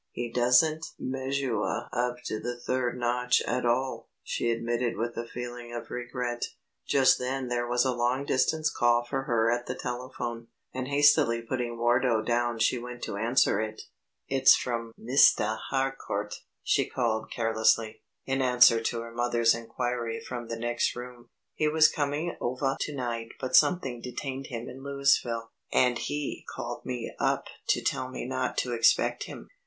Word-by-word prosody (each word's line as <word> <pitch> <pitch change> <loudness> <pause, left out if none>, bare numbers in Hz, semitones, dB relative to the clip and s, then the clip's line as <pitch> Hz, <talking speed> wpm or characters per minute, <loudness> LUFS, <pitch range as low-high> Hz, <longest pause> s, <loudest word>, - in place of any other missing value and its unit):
"He 120 -1 -5
doesn't 125 +7 +3 0.2
measuah 130 -3 -2
up 125 0 0
to 110 - -3
the 120 +2 -5
third 125 0 -1
notch 125 0 +2
at 125 0 0
all," 130 +2 -1
she 120 - -1
admitted 115 +1 -1
with 115 +1 -2
a 115 - -4
feeling 120 0 -7
of 120 - -7
regret. 125 -1 -3 0.4
Just 135 -2 +4
then 130 0 -2
there 120 0 -1
was 120 +1 +2
a 130 - +1
long 125 +3 0
distance 155 +4 +1
call 120 0 +2
for 135 +1 -3
her 115 -2 +2
at 120 0 -2
the 125 - -3
telephone, 120 -2 -5 0.3
and 130 0 -3
hastily 140 -5 +4
putting 120 -1 -3
Wardo 120 -1 +2
down 120 0 0
she 115 +2 +2
went 125 0 -8
to - - -3
answer 115 -1 +2
it. 110 0 -5 0.4
"It's 135 -1 +6
from 115 -2 -3
Mistah 110 -3 +4
Harcourt," 135 -6 -2 0.3
she - - +1
called 110 -3 -1
carelessly, 110 -1 +1 0.2
in 135 0 0
answer 125 -3 +6
to 115 0 -2
her 115 0 -8
mother's 120 -1 +2
inquiry 120 0 -3
from 120 -2 -6
the 115 - -4
next 120 +1 0
room. 120 -1 -9 0.2
"He 155 - 0
was 155 +1 +6
coming 150 +3 -2
ovah 130 +2 0
to 150 - -3
night 115 -3 -4
but 130 0 -1
something 135 -10 +3
detained 130 +2 -5
him 120 0 -6
in 130 +1 -9
Louisville, 140 -5 +1 0.2
and 125 -1 +3
he 145 -1 -3
called - - -6
me 125 -2 -4
up - - +1 0.2
to - - +2
tell 130 - -1
me 130 - -5
not 130 0 -2
to 125 - 0
expect 115 -1 +3
him." - - -9
120 Hz, 165 wpm, -28 LUFS, 115-130 Hz, 0.4 s, It's